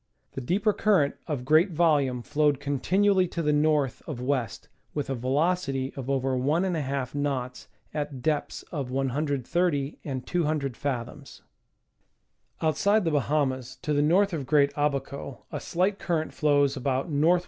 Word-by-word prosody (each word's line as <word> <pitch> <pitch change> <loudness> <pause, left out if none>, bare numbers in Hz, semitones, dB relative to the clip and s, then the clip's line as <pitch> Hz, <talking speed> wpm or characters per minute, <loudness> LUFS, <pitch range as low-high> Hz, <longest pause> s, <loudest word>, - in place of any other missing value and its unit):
The 135 - -5
deeper 200 - +1
current 190 -11 +3
of 140 -6 -3
great 155 +7 +5
volume 145 -7 +2
flowed 145 -1 +1
continually 185 +7 +2
to 170 0 -3
the 150 0 +2
north 150 -3 +2
of 150 -7 -5
west 125 -3 -2 0.3
with 145 -2 -2
a - - +1
velocity 135 +1 0
of 135 -1 -6
over 135 -1 +1
1 145 +8 +1
^ 140 -8 -2
knots 135 -3 -3 0.3
at 145 -4 -4
depths 150 -1 -1
of 140 -6 -3
130 140 +3 -1
and 130 -3 -4
200 150 -7 -1
fathoms. 135 +1 -5 1.2
Outside 200 +7 +3
the 165 - +1
Bahamas, 140 -3 0
to 150 -3 0
the 145 - +3
north 185 +6 +3
of 140 -5 -3
Great 145 -2 +3
Abaco, 140 -2 -2
a - - -3
slight 190 +3 0
cur 175 -3 0
rent 155 - -4
flows 145 -2 +2
about 130 0 -1
N. 145 -4 -1
W. 175 +3 +5
145 Hz, 155 wpm, -27 LUFS, 135-160 Hz, 1.2 s, great